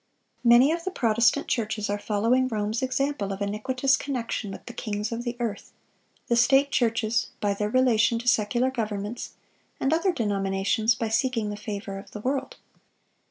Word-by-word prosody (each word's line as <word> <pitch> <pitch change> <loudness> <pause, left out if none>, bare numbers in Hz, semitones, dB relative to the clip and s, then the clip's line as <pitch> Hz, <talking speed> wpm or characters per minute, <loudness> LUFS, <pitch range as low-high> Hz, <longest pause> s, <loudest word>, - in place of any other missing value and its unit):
(630) 240 - +2
Many 265 +5 +5
of 335 0 -4
the 375 - -2
Protestant 235 -3 +2
churches 215 -2 -1
are 205 0 -2
following 230 +6 +1
Rome's 215 0 -2
example 260 -5 -1
of 195 - -4
iniquitous 255 +7 +1
connection 245 -6 -3
with 195 - -9
"the 240 - -8
kings 210 -1 -3
of 230 +1 -3
the 240 0 -4
earth"—the 235 +1 -6
state 270 +4 +4
churches, 225 -1 +1
by 205 -1 +1
their 210 +1 -2
relation 235 -2 +3
to 235 +2 -6
secular 240 +2 +2
governments; 215 -2 -4 0.5
and 270 - +1
other 335 +4 +2
denominations, 205 - +1
by 225 - -2
seeking 225 -2 0
the - - -4
favor 200 -1 -6
of 195 - -13
the 210 - -6
world. 270 - -2
230 Hz, 165 wpm, -26 LUFS, 210-255 Hz, 0.5 s, Many